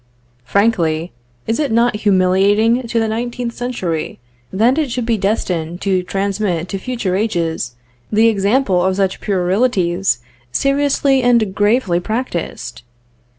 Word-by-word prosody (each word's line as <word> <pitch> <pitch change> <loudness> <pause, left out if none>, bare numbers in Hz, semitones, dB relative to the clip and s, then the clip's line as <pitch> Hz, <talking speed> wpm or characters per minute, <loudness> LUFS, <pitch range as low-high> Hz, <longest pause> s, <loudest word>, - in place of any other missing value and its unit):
Frankly, 170 - +1 0.3
is 225 - -1
it 290 -5 0
not 235 -1 +2
humiliating 205 +4 +3
to 230 0 0
the 225 - +1
nineteenth 235 +2 -3
century, 190 -11 -3 0.3
that 235 +9 +2
it 300 -4 0
should 245 -1 -2
be 230 -1 +1
destined 180 -5 -2
to 190 -2 +1
transmit 195 -2 -2
to 195 - -3
future 220 -5 -2
ages 165 - -1 0.4
the 220 +2 +4
example 200 -2 +2
of 190 0 +1
such 190 -1 -1
puerilities 190 - +1 0.3
seriously 275 - +2
and 235 -5 +2
gravely 205 -3 +2
practiced? 215 -2 -4
205 Hz, 125 wpm, -17 LUFS, 185-235 Hz, 0.4 s, the